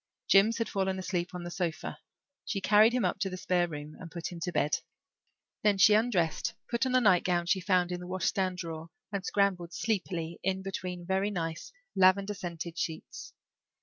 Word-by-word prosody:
Jims 210 +4 +5
had 230 - -1
fallen 190 -1 -1
asleep 180 -1 -3
on 175 - -5
the 175 - -6
sofa; 175 -3 -3 0.4
she 200 - -2
carried 210 +3 +5
him 250 0 +1
up - - -1
to 195 0 0
the 185 - -5
spare 180 -1 +1
room 150 -1 -7
and 170 - -8
put 170 0 -5
him 175 - -7
to 170 +2 -2
bed. 145 -3 +1 0.8
Then 210 -2 +3
she 210 +2 +7
undressed, 210 -8 +1
put 235 +2 0
on 255 - 0
a - - +7
nightgown 180 -4 +3
she 190 +2 +2
found 180 -1 +2
in 180 - -3
the 180 - -8
washstand 185 0 0
drawer, 165 -2 -6 0.2
and 200 -2 -3
scrambled 185 -4 0
sleepily 175 -6 -2
in 190 0 -1
between 180 -2 -5
very 190 +2 +1
nice 165 - -4 0.2
lavender 195 +2 +4
scented 170 -3 -6
sheets. 160 -1 -5
185 Hz, 185 wpm, -30 LUFS, 175-195 Hz, 0.8 s, she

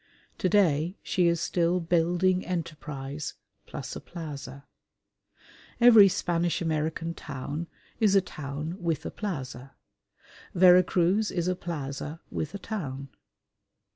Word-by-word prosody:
To 185 - +1
day 175 -3 +2
she 180 -2 +2
is 170 -1 +2
still 175 +1 +1
building 175 +2 +2
enterprise 150 -5 -5 0.3
plus - - -6
a - - -6
plaza. 140 -5 -8 1.1
Every 230 -4 +9
Spanish 175 -2 0
American 160 0 -1
town 145 +2 -5 0.3
is 210 -3 +4
a - - +8
town 155 +3 -6
with 160 -3 -1
a - - -4
plaza: 135 - -6 0.8
Vera 180 0 +8
Cruz 185 +4 +1
is 175 -1 -1
a 185 - +1
plaza 150 -2 -5
with 155 +5 -4
a - - -2
town. 140 -11 -5
170 Hz, 120 wpm, -28 LUFS, 150-180 Hz, 1.1 s, Every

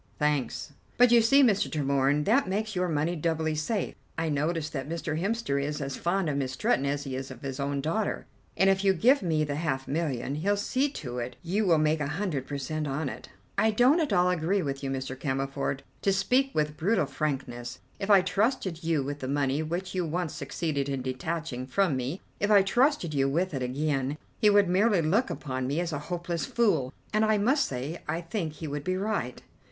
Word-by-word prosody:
"Thanks!" 150 -1 -1 0.2
"But 245 0 +6
you 235 -1 +7
see, 275 +5 +5
Mr. 210 -6 +3
Tremorne, 140 0 +1
that 255 +7 +3
makes 215 +2 -2
your 180 0 +1
money 160 +2 0
doubly 160 -1 0
safe. 175 +7 -2 0.2
I 165 0 0
noticed 155 +2 -1
that 135 0 -4
Mr. 160 -1 -2
Hemster 195 -9 0
is 150 +1 -3
as 140 -2 -3
fond 180 +1 0
of 145 -2 0
Miss 130 -2 -2
Stretton 135 +2 +1
as 140 0 -1
he 135 -2 -4
is 135 +1 -5
of - - -11
his 135 0 -4
own 140 0 -1
daughter, 170 +9 -1 0.3
and 190 +3 +4
if 195 0 +3
you 195 -1 +5
give 255 - +4
me 160 -4 +1
the 145 -1 -2
half 135 -5 -2
million, 140 -4 -1
he'll 195 +8 0
see 260 +7 0
to 125 - -6
it 120 +1 -4
that - - -25
you 185 -2 +3
make 155 +1 +2
a 145 - -1
hundred 145 -4 -2
per 145 - -3
cent 150 +3 -3
on 140 +1 -2
it." - - -9 0.3
"I 220 - +4
don't 245 +9 +4
at 310 -7 0
all 180 -2 +4
agree 180 +3 +1
with 140 -1 -4
you, 135 - -2
Mr. 130 0 -3
Cammerford. 135 0 -2 0.2
To 195 - +2
speak 250 +8 +2
with 150 -1 0
brutal 185 +1 +2
frankness, 135 -4 -3 0.2
if 195 - -3
I 200 -2 +8
trusted 195 -4 0
you 160 -4 +1
with 145 +2 -4
the 130 - -4
money 140 +1 0
which 175 +4 -3
you 185 -1 0
once 170 0 -2
succeeded 140 0 -2
in 135 -2 -2
detaching 130 0 -3
from 180 +1 +2
me, 130 +8 -3 0.2
if 205 - +1
I 205 -2 +7
trusted 240 - +2
you 135 -1 +2
with 170 +5 0
it 135 - -2
again, 135 +2 -1 0.2
he 215 - +5
would 205 -1 +5
merely 190 0 +3
look 205 +12 +2
upon 130 -2 -3
me 145 +5 0
as 170 -2 -2
a 145 - -2
hopeless 175 -3 -2
fool, 205 - +1 0.2
and 215 +1 +3
I 215 -1 +3
must 265 +8 +2
say 135 +6 -5
I 165 - -1
think 165 -2 -3
he 155 +1 -7
would 145 0 -4
be 185 +3 -1
right." 195 - -2
155 Hz, 215 wpm, -28 LUFS, 140-195 Hz, 0.3 s, I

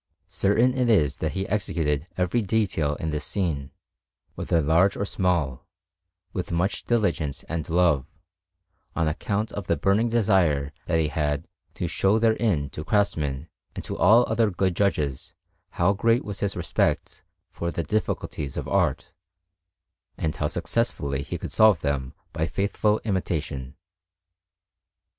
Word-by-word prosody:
Certain 115 +6 +2
it 125 -2 +1
is 75 -10 +3
that 80 - -2
he 95 0 -2
executed 80 -7 -1
every 90 +6 +1
detail 95 -8 0
in 80 +2 -3
this 75 -1 -3
scene, 75 -7 -2 0.6
whether 85 - 0
large 85 +6 +3
or 100 - -1
small, 85 -10 -1 0.7
with 90 -2 -4
much 85 +4 -1
diligence 85 - 0
and 80 0 -4
love, 80 -6 +3 0.9
on 80 - +1
account 105 +7 -1
of 100 -3 -6
the 85 - +1
burning 100 +9 +2
desire 90 -11 +2
that 80 - +2
he 80 -2 +1
had 75 +2 -1 0.3
to - - -3
show 100 +3 +2
therein 110 -9 +2
to 75 - -6
craftsmen 80 -7 0 0.3
and - - -5
to - - -4
all 120 +3 +6
other 115 -2 +2
good 95 -1 0
judges 75 -10 -1 0.4
how 100 - +3
great 115 +4 +2
was 100 -1 -5
his 100 -2 -1
respect 85 -1 -1 0.3
for 85 - -3
the 85 - -2
difficulties 75 -5 -2
of - - -3
art, - - 0 1.1
and 80 -1 -2
how 75 - 0
successfully 85 - -1
he - - -5
could - - -6
solve 110 -2 +5
them 70 -3 -2 0.2
by 80 +1 -1
faithful 105 +3 0
imitation. 75 - -2
85 Hz, 145 wpm, -25 LUFS, 75-105 Hz, 1.1 s, all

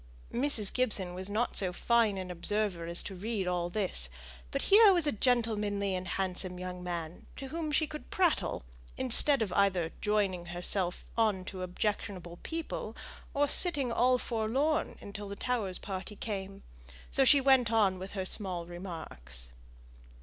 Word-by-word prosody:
Mrs. 240 -5 +1
Gibson 210 -8 0
was 185 +2 -6
not 220 +4 -1
so 185 -2 +2
fine 225 +1 +2
an 185 -1 -5
observer 180 -1 0
as 170 +1 +4
to 195 - -5
read 200 +1 -3
all 175 -1 -1
this; 180 - +1 0.4
but - - -2
here 420 +1 +7
was 350 -4 +2
a 295 - +3
gentlemanly 210 -4 +1
and 185 0 -3
handsome 185 -1 -1
young 180 0 -6
man, 170 -1 -5
to 270 -1 -7
whom 315 0 -3
she 310 +2 +3
could 300 0 -9
prattle, 315 - +1 0.3
instead 260 +1 +5
of 190 -4 -4
either 185 -5 +2
joining 195 -4 0
herself 175 +1 -1
on 215 -5 +1
to 185 -1 -7
objectionable 180 -2 -3
people, 330 -1 -5 0.4
or 290 +1 +3
sitting 285 -7 +3
all 250 +2 +3
forlorn 255 +8 -1
until 205 0 -7
the 200 - -5
Towers' 210 -6 -2
party 195 +1 -6
came. 195 -2 -5 0.5
So 275 - +3
she 280 +2 +7
went 265 -4 +4
on 200 -5 +3
with 190 +1 -8
her 190 -2 -3
small 185 -4 -1
remarks. 160 - -7
200 Hz, 155 wpm, -31 LUFS, 180-245 Hz, 0.5 s, here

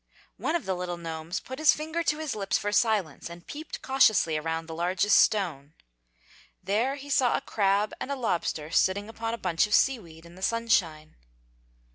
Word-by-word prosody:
One 315 - -1
of 340 - -2
the 190 - 0
little 180 -1 -4
gnomes 165 0 -5
put 260 +2 -9
his 310 -1 +5
finger 315 +2 -3
to 300 -2 0
his 310 -3 -3
lips 200 -2 0
for 205 -1 -2
silence 205 - +1
and 170 0 -11
peeped 305 +2 -8
cautiously 220 -11 +3
around 160 +1 -2
the 160 - -8
largest 185 +5 +3
stone. 160 -8 +1 0.9
There 220 +8 0
he 285 0 -10
saw 260 -3 +3
a - - -5
crab 200 0 +1
and - - -4
a - - 0
lobster 170 - -2
sitting 200 +4 +2
upon 225 0 -3
a - - -11
bunch 180 -2 +1
of 210 - +3
sea 270 -3 +3
weed 165 -4 -14
in 170 - -14
the 185 - -14
sunshine. 190 -9 0
200 Hz, 190 wpm, -27 LUFS, 170-240 Hz, 0.9 s, his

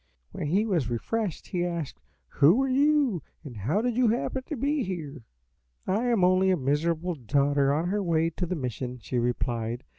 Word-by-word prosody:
When - - -4
he 195 +8 +2
was 170 - 0
refreshed 190 - -3
he 180 -3 -1
asked, 170 -5 -4 0.3
'Who 170 - +4
are - - 0
you, 275 - +2 0.2
and 135 -6 -9
how 135 - 0
did 245 -2 0
you 250 0 +3
happen 240 +3 0
to 305 - -3
be 285 +4 0
here?' 155 - -5 0.6
"'I 210 +6 0
am 230 -6 +2
only 185 +1 +4
a 185 - +3
miserable 160 +6 0
daughter 140 +1 +1
on 160 +5 0
her 205 +2 0
way 165 -2 +1
to 175 +2 -3
the 180 - -2
mission,' 125 -3 -4
she 120 +2 -2
replied. 120 -1 -2
170 Hz, 185 wpm, -27 LUFS, 140-215 Hz, 0.6 s, Who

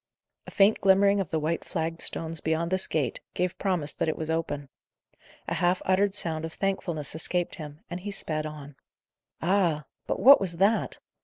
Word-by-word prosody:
A - - -5
faint 205 +1 +3
glimmering 200 +1 +4
of 190 -6 -2
the 160 - 0
white 160 +2 -1
flagged 165 -1 -3
stones 165 0 0
beyond 160 +3 -1
this 185 0 +1
gate, 140 -7 -1 0.2
gave 180 0 -1
promise 180 -7 -1
that - - -2
it 155 - -2
was 160 0 -3
open. 145 -3 -2 0.8
A - - -1
half 180 +1 +1
uttered 195 +1 +2
sound 160 -5 -1
of 160 0 -5
thankfulness 175 -6 -2
escaped 175 +2 0
him, 150 +1 -9
and 175 +1 -5
he 200 +3 -6
sped 155 -6 -2
on. 145 -2 -10 0.7
Ah! 170 -5 +2 0.2
but - - -1
what 275 -1 +8
was 175 -3 -2
that? 200 +5 +2
170 Hz, 180 wpm, -27 LUFS, 155-190 Hz, 0.8 s, what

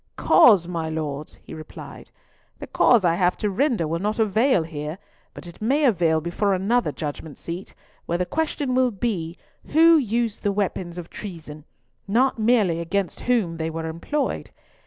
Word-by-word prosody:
"Cause, 195 -8 +5
my 165 -3 -3
Lords?" 150 -2 -5
he - - -11
replied. 155 -1 -10 0.5
"The - - -7
cause 230 -6 +3
I 170 - +4
have 180 +1 +1
to 210 -2 -1
render 225 - +1
will 165 +2 -2
not 210 +3 -2
avail 220 -1 +2
here, 155 0 -6 0.4
but - - -10
it 170 +3 -12
may 280 +7 +2
avail 170 -9 +3
before 180 +5 0
another 225 +7 +1
Judgment 150 -1 -6
seat, 175 +3 -7 0.3
where 170 - 0
the 180 - -1
question 295 - -2
will 255 0 +3
be, 190 -7 -3 0.3
who 330 +1 +6
used 235 -4 -1
the 205 - 0
weapons 185 -3 -3
of 175 -1 -8
treason, 160 -6 -9 0.4
not 240 +4 +2
merely 215 -7 +2
against 180 +3 -2
whom 200 -10 +1
they 160 0 -2
were 165 0 -5
employed. 170 - -3
185 Hz, 165 wpm, -23 LUFS, 165-230 Hz, 0.5 s, who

